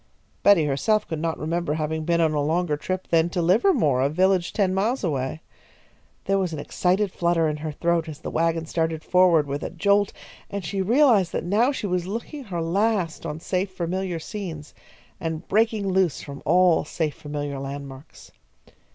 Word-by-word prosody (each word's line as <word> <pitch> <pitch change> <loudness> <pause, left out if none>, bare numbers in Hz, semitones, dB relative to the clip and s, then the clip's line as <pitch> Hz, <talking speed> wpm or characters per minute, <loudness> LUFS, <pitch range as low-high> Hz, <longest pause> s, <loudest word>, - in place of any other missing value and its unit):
Betty 200 -6 +5
herself 180 +10 +1
could 160 -3 -4
not 165 0 -2
remember 165 -1 -2
having 155 0 -2
been 170 0 +2
on 160 -2 +2
a 150 - +1
longer 160 +1 0
trip 185 +5 -4
than 165 0 +3
to 175 - -3
Livermore, 175 - +3
a 135 - +2
village 185 +2 +2
ten 190 -3 +1
miles 215 +7 0
away. 145 -2 -2 0.8
There 195 0 +2
was 185 -3 -1
an - - -4
excited 185 +6 0
flutter 170 -2 +1
in 150 0 -2
her 155 +1 -4
throat 170 +1 0
as 150 - -7
the - - -7
wagon 165 0 0
started 160 -1 -2
forward 180 -4 +4
with 140 +1 -4
a - - -4
jolt, 200 +4 +2 0.4
and 200 -3 -5
she 195 +4 -2
realised 220 - +4
that - - -2
now 220 +9 +3
she 265 - -4
was 180 -2 -1
looking 235 +7 -6
her 175 -5 -3
last 185 -3 0
on 150 - -5
safe 185 +3 -1
familiar 185 0 -3
scenes, 165 -4 -7 0.5
and 160 +1 -4
breaking 220 -1 +1
loose 190 -4 +1
from 140 -1 -9
all 175 +2 +4
safe 155 -1 -2
familiar 145 -1 -5
landmarks. 140 +1 -9
170 Hz, 180 wpm, -24 LUFS, 155-190 Hz, 0.8 s, Betty